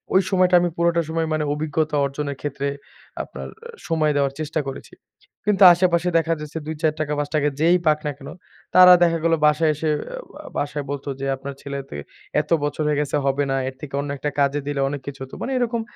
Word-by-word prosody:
ওই 190 - +7
সময়টা 185 -1 +4
আমি 175 - +1
পুরোটা 170 0 +2
সময় 165 0 -1
মানে 155 -1 0
অভিজ্ঞতা 155 +1 -1
অর্জনের 140 0 -4
ক্ষেত্রে 140 -1 -3 0.6
আপনার - - -8
অ্যা 470 0 -12
সময় 155 -2 +1
দেওয়ার 140 -1 +1
চেষ্টা 155 0 -2
করেছি। 135 - -8 0.5
কিন্তু 205 -1 +3
আশেপাশে 175 0 +2
দেখা 165 0 +1
যাচ্ছে 150 +1 -6
৳২-৳৪, 155 -1 -1
৳৫ 150 0 0
যেই 170 +3 +5
পাক 150 0 +4
না - - 0
কেন, 140 -1 -10 0.5
তারা 180 0 +10
দেখা 170 -1 +3
গেলো 165 0 +3
বাসায় 150 +1 +4
এসে 155 +2 -2 0.2
অ্যা - - -7 0.3
ও - - -11
বাসায় 145 0 -2
বলত 140 -1 -4
যে 135 - -3
"আপনার 140 +1 -7
ছেলে 140 0 -5
ত - - -28 0.5
এত - - -15
বছর 145 +1 -1
হয়ে 150 -1 +1
গেছে 150 0 -1
হবে 140 +1 +1
না, - - +1
এর 130 - -12
থেকে 145 -3 -8
অন্য 145 - -5
একটা 150 +2 -2
কাজে 140 +1 +2
দিলে 145 -1 -1
অনেক 145 -1 -5
কিছু 140 -1 -6
হত।" 135 - -11
মানে 270 - -3
এরকম 235 -2 0
150 Hz, 205 wpm, -22 LUFS, 145-170 Hz, 0.6 s, তারা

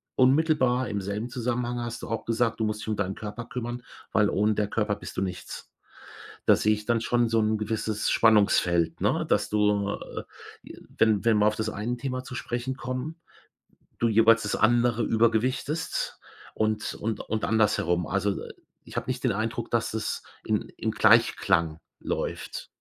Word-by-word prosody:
unmittelbar 130 -2 +3
im 105 -2 -2
selben 105 +5 -4
Zusammenhang 120 0 -2
hast 120 -1 -5
du - - -7
auch 115 -1 -3
gesagt, 115 0 0
du - - +1
musst 105 0 -2
dich - - -8
um 110 - 0
deinen 95 -1 -2
Körper 110 +2 -6
kümmern, 120 0 -5 0.3
weil 105 -2 +4
ohne 105 +1 +2
der 105 -1 0
Körper 105 -1 0
bist - - -9
du - - +1
nichts. 90 -2 -6 0.8
Da - - +7
sehe 110 0 +2
ich 105 0 -8
dann 120 -1 +2
schon 120 0 +1
so 115 0 +2
'n 110 0 +2
gewisses 105 0 -1
Spannungsfeld, 100 -6 +3
ne, - - +1
dass - - +2
du, 105 -1 +2
äh, - - -6 0.4
j - - -11 0.2
wenn 110 -2 +3
wenn 115 -2 +4
wir 105 - +4
auf 105 - +3
das 110 0 -2
eine 115 +4 -3
Thema 130 0 -4
zu 125 - -8
sprechen 125 +2 -3
kommen, 130 +7 -5 0.8
du 115 - +3
jeweils 115 +1 +5
das 105 - -1
andere 120 0 +3
übergewichtest 115 +8 0 0.4
und 110 -1 -1
und 110 0 -3
und 110 -1 -3
andersherum, 95 -6 +2
also, 100 +2 0
äh, - - -9 0.3
ich - - -11
habe - - -2
nicht 130 0 -3
den 120 - +3
Eindruck, 115 +3 -3
dass 115 -1 0
es 110 - -2 0.2
in - - -1
im - - -1
Gleichklang 80 -1 +3 0.2
läuft. - - -4
110 Hz, 180 wpm, -27 LUFS, 105-120 Hz, 0.8 s, Da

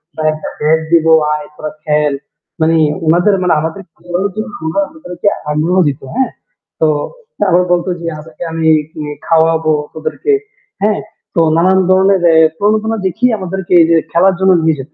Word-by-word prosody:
বা 155 - -5
একটা 155 - -7
ব্যাট 155 +2 +2
দিবো, 165 -1 +4 0.2
আয় 150 -1 -5
তোরা 155 0 -6
খেল।" 150 -1 +1 0.5
মানে 160 +1 +3 0.3
ওনাদের 175 +5 +3
মানে 180 -2 +2
আমাদের 160 +5 -4
খেলানোর 175 +3 -3
জন্য 215 +1 -4
উনারা 160 +5 0
আমাদেরকে 275 - -6 0.2
আগ্রহ 160 +5 0
দিত, 140 -2 -3
হ্যাঁ? 260 -1 0 0.5
তো 160 - +4 0.6
আবার 180 +1 +4
বলত 175 0 0
যে, 170 - -5
"আজকে 155 0 -14
আমি 160 0 -1 0.4
নে 150 - -5
খাওয়াবো 160 -1 +2 0.2
তোদেরকে" 360 - -2 0.5
হ্যাঁ? 210 0 +2 0.4
তো 170 - +3 0.2
নানান 185 +3 +3
ধরনের 190 0 +3 0.3
প্রণোদনা 215 +2 0
দেখিয়ে 245 +7 +1
আমাদেরকে 190 0 -4
এইযে 165 0 +4
খেলার 185 +2 +3
জন্য 190 0 +4
নিয়ে 160 -1 +2
যেত। 140 +3 -9
170 Hz, 155 wpm, -14 LUFS, 160-195 Hz, 0.6 s, দিবো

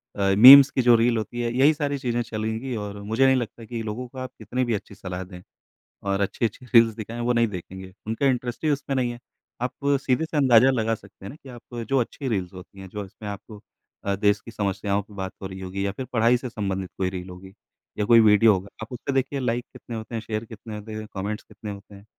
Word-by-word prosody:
अ, 100 -1 +2
memes 135 +4 +11
की 130 - +1
जो 120 -1 +6
reel 115 +1 +3
होती 120 +2 -4
है 120 0 -1
यही 140 +5 +5
सारी 145 -2 -2
चीज़ें 120 -2 -1
चलेंगी 110 +2 -3
और 105 -1 -5
मुझे 110 +6 +2
नहीं 130 0 +5
लगता 120 -2 -4
कि 115 0 -5
लोगों 110 +4 -5
को 130 - -15
आप 130 -1 -5
कितनी 130 +1 -2
भी 120 - -1
अच्छी 105 - -5
सलाह 90 0 -6
दें। 90 -1 -11 0.6
और 100 0 0
अच्छी-अच्छी 115 +4 -2
रील्स 115 -1 +6
दिखाएँ 115 +1 -7
वो 125 - +2
नहीं 120 -1 +3
देखेंगे। 95 -1 -8
उनका 115 +6 -1
इंटरेस्ट 125 -1 -1
ही 155 - +2
उसमें 140 -1 -1
नहीं 125 -2 0
है। 120 - -9 0.4
आप 125 - -2 0.3
सीधे 130 +3 +1
से 160 -1 -4
अंदाज़ा 130 -2 +6
लगा 115 -3 0
सकते 100 -2 -16
हैं - - -6
ना 135 - -9
कि 135 - -11
आप 120 0 -12
जो 135 -1 +3
अच्छी 135 +3 -3
रील्स 95 -7 -2
होती 95 +1 -12
हैं 95 -1 -9
जो 105 +1 -5
इसमें 105 +2 -9
आपको 100 +1 -9 0.4
अ, 100 0 0
देश 105 +1 +2
की 115 - -9
समस्याओं 100 -1 -1
की 105 - -18
बात 95 -1 -5
हो 95 - -4
रही 95 0 -9
होगी 95 +1 -4
या 100 - 0
फिर 130 +6 -6
पढ़ाई 115 +1 +4
से 125 0 -6
संबंधित 95 -4 -3
कोई 95 -1 0
रील 90 0 -7
होगी 95 +1 -11 0.4
या 105 - 0
कोई 115 +1 +7
वीडियो 110 0 +6
होगा 95 0 -3 0.2
आप 115 - -10
उस 125 - -6
पे 140 - 0
देखिए 135 +1 0
लाइक 125 -1 -1
कितने 120 -1 -9
होते 110 +1 -6
हैं? 115 - -2
शेयर 110 0 -4
कितने 110 0 -9
होते 105 +1 -8
हैं? 110 0 -5
कमेंट्स 105 +2 -4
कितने 105 - -9
होते 100 0 -11
हैं? 100 +1 -15
110 Hz, 250 wpm, -24 LUFS, 100-125 Hz, 0.6 s, memes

